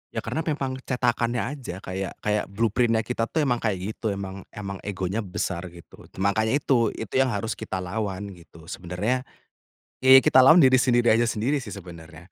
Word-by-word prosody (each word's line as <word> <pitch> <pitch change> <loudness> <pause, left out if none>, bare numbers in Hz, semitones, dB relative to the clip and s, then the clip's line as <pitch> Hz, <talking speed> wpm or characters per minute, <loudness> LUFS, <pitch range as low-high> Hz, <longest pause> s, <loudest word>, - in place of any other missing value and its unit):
Ya, - - -2
karena 160 - -3
memang 140 -5 -2
cetakannya 120 -2 0
aja. 100 -9 -8
Kayak, 95 0 -5
kayak 105 0 0
blueprint-nya 115 +3 +1
kita 115 -1 -2
tuh 160 - 0
emang 125 -4 +1
kayak 100 -2 -2
gitu. 110 - -5
Emang, 95 -1 -7
emang 100 -2 -6
egonya 95 +1 -3
besar, 90 -3 -3
gitu. 85 -1 -15
Makanya 110 +5 +1
itu, 125 -6 +1
itu 110 - -7
yang 135 - +4
harus 110 0 -2
kita 95 -1 -4
lawan, 100 0 -4
gitu. 85 -3 -15
Sebenarnya, 105 +9 -2 0.7
ye, 130 0 +8
kita 130 - +5
lawan 160 +6 +8
diri 130 -1 +6
sendiri 120 -2 +3
aja 115 +1 +3
sendiri 125 +7 0
sih, 115 -6 -8
sebenarnya. 85 -1 -12
110 Hz, 175 wpm, -25 LUFS, 95-125 Hz, 0.7 s, ye